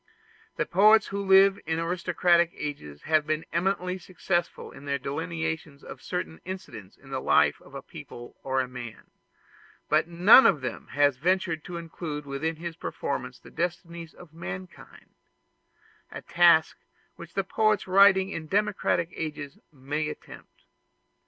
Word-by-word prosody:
The - - -1
poets 215 +4 +5
who 200 +1 -3
lived 195 0 +5
in 160 0 -1
aristocratic 170 0 +2
ages 105 - -7
have 155 -1 +1
been 155 +1 -1
eminently 180 +1 -1
successful 175 -1 -3
in 140 - -13
their 140 0 -1
delineations 160 +1 -4
of - - -10
certain 180 -3 -5
incidents 135 - -9
in 135 0 -17
the 130 -1 -3
life 75 0 +3
of - - -16
a - - -7
people 120 0 -11
or 130 0 0
a 130 - -4
man; 125 -3 -10 0.8
but 155 +2 +2
none 180 +9 +7
of 155 -8 +2
them 130 - -6
ever 145 0 +4
ventured 170 +2 0
to 175 - -6
include 160 -3 -6
within 140 +4 -3
his 165 +1 -7
performances - - -5
the - - -14
destinies 170 -1 -5
of 170 -3 -15
mankind 95 - -9 1.0
a - - -8
task 170 -2 +4 0.4
which 170 -1 -12
poets 210 +2 +1
writing 190 0 +5
in 160 -4 -6
democratic 195 -3 0
ages 150 -3 -6
may 150 +2 -3
attempt. - - -12
165 Hz, 145 wpm, -27 LUFS, 145-180 Hz, 1.0 s, none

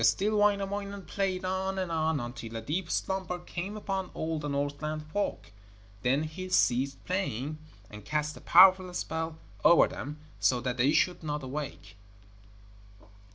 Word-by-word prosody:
Still 195 - +3
Wainamoinen 200 -1 +1
played 190 -2 -1
on 190 +1 -1
and 185 -2 -2
on, 160 -2 +1
until 120 -2 -6
a 115 - -3
deep 165 +7 -2
slumber 190 -2 -1
came 180 +3 -5
upon 195 -3 -3
all 160 0 -2
the 150 - -4
Northland 145 +2 -2
folk. 205 - -2 0.5
Then 135 +6 +2
he 185 +4 -6
ceased 135 -5 +2
playing, 155 - -2 0.3
and 105 -1 -11
cast 150 +6 -1
a - - -12
powerful 185 +1 +7
spell 160 -1 -3 0.3
over 170 - +7
them, 145 +2 -6 0.2
so 125 - +3
that 125 0 -2
they 130 +4 +4
should 180 +3 +2
not 150 -2 -3
awake. 130 - -6
160 Hz, 150 wpm, -30 LUFS, 140-190 Hz, 0.5 s, powerful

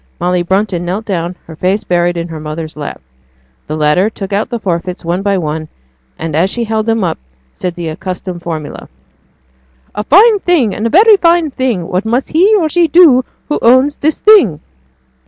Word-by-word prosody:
Molly 180 0 0
Brunton 190 0 -1
knelt 190 +5 -4
down, 180 -3 -3
her 160 - -11
face 190 +6 -1
buried 175 0 0
in 170 0 -4
her 160 -1 -7
mother's 155 +1 -6
lap; 150 -1 -6 0.7
the 155 - -4
latter 155 +7 +2
took 200 -2 -7
out 205 +2 -1
the 240 - -3
forfeits 180 -3 -4
one 175 +3 -1
by 200 -1 0
one, 155 -2 -3 0.5
and 160 -2 -4
as 175 +5 +2
she 235 +3 -3
held 220 -1 -2
them 225 -2 +1
up, 170 - -2 0.3
said 180 -2 -5
the 175 -2 -5
accustomed 180 +1 -6
formula, 160 -4 -6 1.0
'A 210 - -3
fine 415 - +5
thing 310 - +1
and 220 - -2
a - - -1
very 415 - +6
fine 335 -3 +2
thing, 240 -10 -2
what 185 +2 -1
must 235 +4 -1
he 380 +7 +4
(or 345 -6 +2
she) 340 +2 +2
do 300 -6 +5 0.2
who 295 - -1
owns 260 +5 +3
this 310 +1 -1
thing.' 380 - +5
195 Hz, 190 wpm, -13 LUFS, 170-260 Hz, 1.0 s, very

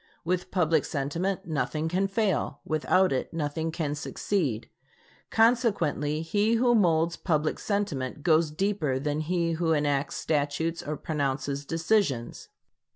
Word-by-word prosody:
With 180 +1 -1
public 165 -3 +2
sentiment, 170 +7 -2
nothing 155 -1 -1
can 185 +4 +1
fail; 195 -4 0
without 185 +4 +2
it 130 - -1
nothing 160 0 -2
can 155 -3 -2
succeed. 150 - -2 0.6
Consequently, 195 - +2
he 205 +7 +2
who 240 +1 +3
molds 170 -6 +3
public 155 -3 0
sentiment 150 - -2
goes 160 -1 +4
deeper 155 -4 0
than 145 +2 -1
he 170 +1 0
who 165 0 +1
enacts 145 -2 0
statutes 155 +2 -1
or 150 0 -4
pronounces 140 -2 -2
decisions. 165 - 0
160 Hz, 125 wpm, -27 LUFS, 145-185 Hz, 0.6 s, goes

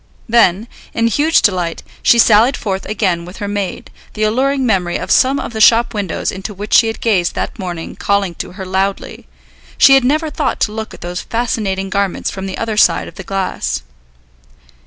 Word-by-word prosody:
Then, 225 -2 +3 0.3
in 230 - +1
huge 290 +8 +2
delight, 180 -4 0 0.2
she 235 - +4
sallied 230 +3 +5
forth 195 -2 -4
again 185 -5 -1
with 180 +3 -11
her 205 - -4
maid, 200 -2 -4 0.2
the 215 - -1
alluring 265 +5 +1
memory 185 -6 0
of - - -5
some 270 +2 +3
of - - -6
the 220 - -3
shop 235 +2 +5
windows 205 -3 -2
into 195 +2 -7
which 205 +2 -6
she 225 - +6
had 225 - -5
gazed 190 -7 +1
that - - -4
morning 175 -3 -6
calling 200 -3 0
to - - -9
her 190 0 -7
loudly; 190 +1 -3 0.5
she 270 - +7
had 270 -1 +5
never 305 +4 0
thought 295 -3 -2
to 210 - +1
look 220 0 -6
at - - -17
those 175 +1 -5
fascinating 205 -5 -2
garments 200 -2 -1
from 190 0 -6
the 190 - -5
other 225 -2 -3
side - - +3
of - - -11
the 190 - -9
glass. 190 - -3
205 Hz, 195 wpm, -16 LUFS, 190-230 Hz, 0.5 s, she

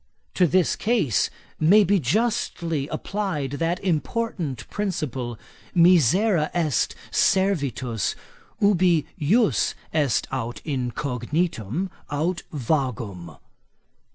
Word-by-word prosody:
To 180 - +3
this 180 +2 +2
case 210 - +1 0.3
may 200 +7 +6
be 200 +1 +3
justly 165 - 0
applied 180 -9 -3
that 165 +2 0
important 165 - -2
principle, 135 - -3 0.4
misera 175 - +4
est 160 -6 +1 0.2
servitus 140 - +1 0.4
ubi 180 -6 +3
jus 205 +9 +2 0.2
est 145 -7 +1
aut 115 +1 -3
incognitum 140 - -2 0.2
aut 160 +5 -1
vagum. 115 - -2
160 Hz, 85 wpm, -24 LUFS, 130-185 Hz, 0.4 s, may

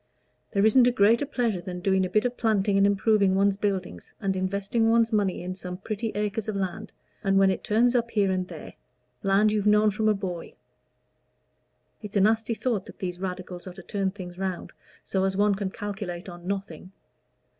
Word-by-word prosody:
There 200 -1 +2
isn't 245 +3 +6
a - - +4
greater 230 +5 +3
pleasure 235 -9 -1
than 180 0 -6
doing 190 0 +2
a - - -11
bit 215 +4 +2
of 245 0 -1
planting 210 -4 +1
and 195 0 +5
improving 200 -1 +3
one's 200 0 +3
buildings, 190 - -3
and 195 -1 -1
investing 200 +4 0
one's 230 0 +3
money 200 -4 0
in 180 +1 -4
some 180 -1 -7
pretty 215 +3 -4
acres 210 +1 -2
of 215 - -2
land, 195 +2 -4 0.3
and 195 -1 +2
when 195 0 +5
it - - -4
turns 235 +3 +3
up 235 -1 +1
here 205 -4 +1
and 185 -1 -1
there - - -9 0.5
land 200 +1 +3
you've 210 -1 0
known 210 0 +5
from 215 +2 +1
a 210 - +3
boy. 180 -4 -6 1.5
It's 210 -2 -9
a 200 - +4
nasty 225 +2 +2
thought 220 -5 -2
that - - -12
these 180 -2 -5
Radicals 180 -1 -6
are 185 - -7
to - - -11
turn 200 -3 -1
things 185 -2 -9
round 190 -2 -3 0.3
so 190 -1 -1
as 190 0 0
one 205 0 +3
can 195 -1 -2
calculate 195 -3 -6
on 175 -1 -10
nothing. 190 -3 -5
200 Hz, 200 wpm, -26 LUFS, 190-215 Hz, 1.5 s, isn't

